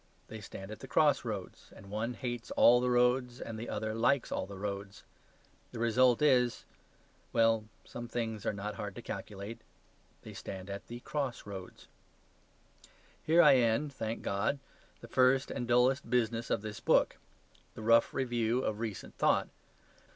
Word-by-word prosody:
They 110 -1 -8
stand 95 0 -9
at 110 - -8
the 135 - -9
crossroads, 120 -10 0
and 100 - -13
one 115 +3 -2
hates 120 -1 -5
all 120 +1 +6
the 125 - +1
roads 125 0 +2
and 110 -1 -6
the 115 - -6
other 110 0 -2
likes 125 +4 +1
all - - -2
the 100 -1 -9
roads. 100 -1 -5 0.7
The - - -6
result 120 +3 +3
is 125 -4 +3 0.7
well, 115 -1 +3 0.2
some 120 0 -7
things 115 -3 -3
are - - 0
not 105 +1 -5
hard 105 -3 -6
to - - -8
calculate. 100 +3 -6 0.6
They - - -9
stand 95 0 -7
at 100 - -7
the 120 +1 -8
cross 140 -4 -3
roads. 95 -3 -9 1.4
Here 170 +2 +5
I 135 - +7
end 125 +5 +1
(thank 115 -3 -4
God) 100 +8 0 0.4
the 120 - -10
first 130 +2 +3
and 120 - -3
dullest 125 +3 +3
business 115 -1 0
of 100 - 0
this 110 -1 -6
book - - +3 0.6
the 110 - -8
rough 115 +1 +5
review 120 -1 0
of 105 -1 -2
recent 110 -4 -5
thought. - - +3
115 Hz, 160 wpm, -32 LUFS, 105-125 Hz, 1.4 s, I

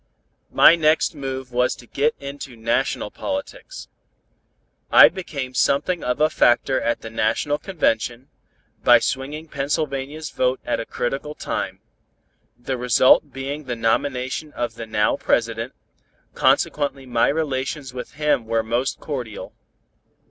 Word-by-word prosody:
My 165 - +7
next 155 0 +2
move 135 -3 -5
was 125 +1 +1
to 120 - -15
get 145 +5 0
into 140 -2 -8
national 115 -1 -1
politics. 290 - -6 1.0
I - - +9
became 140 -9 -6
something 140 +8 +1
of 125 0 -1
a 155 - +5
factor 130 -2 +2
at 120 - -1
the 115 - -8
national 115 +7 0
convention, 125 - -1 0.6
by - - +8
swinging 145 +4 -3
Pennsylvania's 145 +1 -3
vote 130 0 0
at 120 - -1
a 115 - -5
critical 140 +4 -3
time; - - -4 0.8
the 125 +2 -4
result 125 +1 +4
being 140 +3 -5
the 125 -2 -3
nomination 130 +5 -1
of 120 -1 -3
the 115 0 -8
now 105 -1 +1
President, - - 0 0.6
consequently 140 -2 +1
my 120 -2 +2
relations 140 -2 -2
with 125 -1 -7
him 150 -6 0
were 115 0 +1
most 120 +4 -1
cordial. 125 -8 -6
135 Hz, 130 wpm, -22 LUFS, 120-150 Hz, 1.0 s, I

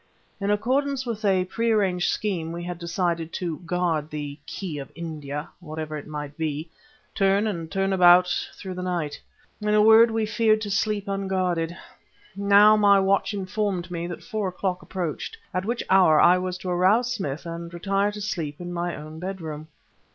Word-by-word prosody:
In 200 0 -1
accordance 260 +5 0
with 230 -2 -4
a 190 -3 +3
pre 230 +5 -1
arranged 190 -5 +2
scheme 180 -7 -2
we 170 +1 -5
had 175 -1 -5
decided 170 -1 -1
to 170 -4 -3
guard 165 -4 0
"the 145 -1 -6
key 175 -7 -5
of 135 - -8
India" 150 -3 -5
(whatever 155 -2 -6
it 150 - -7
might 150 -1 -6
be) 160 0 -3 0.4
turn 195 +1 +2
and 170 -7 -3
turn 195 0 0
about 180 -1 +7 0.3
through 190 -1 -7
the 180 - -5
night. 175 -5 -3 0.4
In 210 0 +1
a 210 - +6
word 225 +2 +7
we 225 -1 0
feared 215 0 +2
to 205 -2 -4
sleep 205 0 0
unguarded. 185 -4 -1 0.6
Now 200 +2 +6
my 200 -2 +5
watch 195 +1 +2
informed 190 -2 -2
me 170 0 -3
that 175 - -7
four 215 -4 -2
o'clock 185 0 -2
approached, 185 - -4 0.2
at 185 +1 -1
which 235 +2 -2
hour 180 -5 +5
I 180 +1 +6
was 185 0 -3
to 185 - -6
arouse 210 +8 +3
Smith 160 - -4
and 170 0 -6
retire 195 +4 0
to 210 0 -7
sleep 160 -8 -3
to 175 - -8
my 175 -1 -3
own 155 +1 -9
bedroom. 160 -5 -6
185 Hz, 180 wpm, -25 LUFS, 165-205 Hz, 0.6 s, about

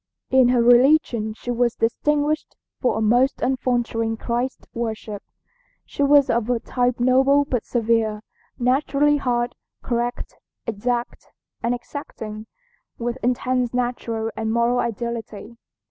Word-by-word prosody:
"In 260 -1 +6
her 245 -1 +3
religion 245 -3 +4
she 245 - -5
was 240 -1 +1
distinguished 295 +6 0 0.2
for 250 - +1
a - - -1
most 245 +5 +3
unfaltering 240 -3 0
Christ 240 +3 -3
worship. 220 -3 -4 0.6
She - - -6
was 285 0 +5
of 235 0 0
a 245 -2 +1
type 245 +1 -1
noble 265 +3 +4
but 250 -5 -2
severe, 225 -2 0 0.3
naturally 280 +3 +2
hard, 245 -3 -1 0.3
correct, 240 0 -3 0.3
exact 240 +2 -3 0.3
and 235 +1 0
exacting, 220 -4 -8 0.5
with 240 +2 -3
intense 250 0 0
natural 230 -2 -2
and 220 0 -2
moral 235 +2 +2
ideality. 235 -1 -4
240 Hz, 120 wpm, -22 LUFS, 230-255 Hz, 0.6 s, In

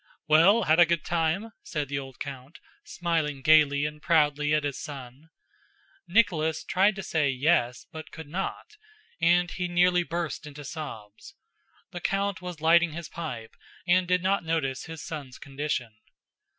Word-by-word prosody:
"Well—had 165 +2 +5
a 175 - +7
good 170 -2 0
time?" 170 +6 0
said 150 -3 -4
the 140 +1 -2
old 135 -3 -10
count, 135 +2 -8 0.3
smiling 160 -5 -2
gaily 150 -2 +5
and 150 0 -5
proudly 150 -3 +2
at 150 0 +2
his 145 -2 -3
son. 135 +1 -9 0.8
Nicholas 160 -7 +2
tried 195 +2 +2
to 195 - -6
say 150 -5 +1
"Yes," 130 -2 +1
but 160 0 -9
could 160 -2 -10
not: 195 - -5 0.4
and 175 +1 +3
he 180 -1 -3
nearly 180 0 +3
burst 170 -2 -4
into 145 0 -10
sobs. 110 -9 -8 0.6
The 175 - -7
count 195 0 -1
was 180 -3 -7
lighting 170 0 +4
his 170 0 -7
pipe 125 -10 -7 0.3
and 180 0 +3
did 180 0 +1
not 195 0 +1
notice 145 -5 -2
his 160 -1 -8
son's 140 -5 -7
condition. 135 -4 -4
160 Hz, 150 wpm, -27 LUFS, 145-175 Hz, 0.8 s, a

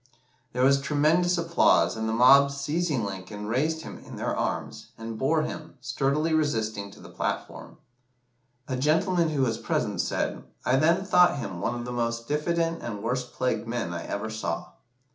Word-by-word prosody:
There 125 +1 +1
was 140 +1 +5
tremendous 160 +5 +2
applause, 170 -6 +3
and 110 0 -2
the - - 0
mob 135 +4 +7
seizing 140 -2 -1
Lincoln, 100 +2 -6
raised 155 +9 0
him - - -8
in - - -11
their - - -2
arms, - - -4
and 115 0 -6
bore 155 +7 +1
him, 155 0 -6
sturdily 140 +6 0
resisting, 110 -10 0
to - - -15
the - - -12
platform. - - -4 0.9
A 130 - -2
gentleman 165 +5 +2
who 145 -3 0
was 115 -3 0
present - - -1
said - - -2 0.2
"I 130 - +3
then 165 +6 +3
thought 180 -5 +5
him 95 -9 -5
one 120 - -1
of 120 0 -5
the 125 - -5
most 115 -1 -2
diffident 165 +3 0
and 105 -4 -5
worst 125 +2 -2
plagued 115 -3 -1
men 115 -7 -2
I 85 - -4
ever 110 +2 -3
saw." 110 0 -4
130 Hz, 175 wpm, -27 LUFS, 115-155 Hz, 0.9 s, mob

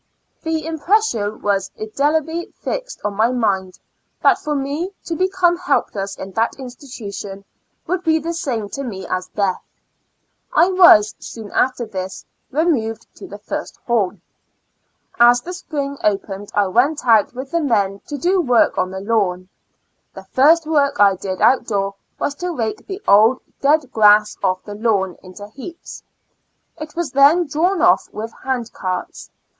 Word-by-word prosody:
The 320 -2 -2
impression 320 - 0
was 195 -2 0
indelibly 305 +9 -1
fixed - - -5
on 210 - -1
my 220 +3 +3
mind, 195 -7 -1 0.5
that - - +5
for 300 0 -3
me 290 +7 -3
to 330 - -3
become 370 -1 +2
helpless 200 - -1
in 190 - -7
that 225 +4 0
institution, 220 -7 -8 0.4
would 370 0 -2
be 320 -2 +3
the 330 +2 -3
same 250 - -3
to 275 - -5
me 195 -7 -6
as 185 0 -3
death. 200 -3 -1 0.9
I 355 - +5
was, 350 - +7
soon 220 -3 -9
after 255 -2 +1
this, 190 -2 -6 0.3
remov 275 -7 +1
ed 230 +1 -25
to - - -10
the - - -9
first - - -6
hall. 215 -6 +1 1.1
As 240 +1 +6
the 360 +6 -7
spring 280 -6 -5
opened 200 -1 -1
I 205 - +3
went 250 +11 +1
out 225 -1 +4
with 265 +2 -7
the 335 - +1
men 200 -8 +1
to 345 +7 0
work 245 -7 +3
on 185 - 0
the 190 0 -6
lawn. 195 -4 0 0.7
The - - -9
first 315 +5 +5
work 290 -3 +1
I 200 -1 +6
did 185 0 -5
out 255 -2 +4
door 200 -2 -1 0.2
was 285 - -2
to 360 - -1
rake 225 -10 -3
the 390 +1 -7
old 220 +5 +5 0.2
dead 290 -1 +2
grass 210 -1 +5
ofi" 185 -1 -1
the 205 - -8
lawn 205 -4 0
into 190 +2 -11
heaps. 310 +9 -10 0.8
It 310 0 -8
was 340 -4 -2
then 285 +6 +5
drawn 330 +5 0
off 180 +1 +4
with 225 +2 -6
hand 250 -3 -3
carts. 185 -1 -5
240 Hz, 160 wpm, -19 LUFS, 205-315 Hz, 1.1 s, was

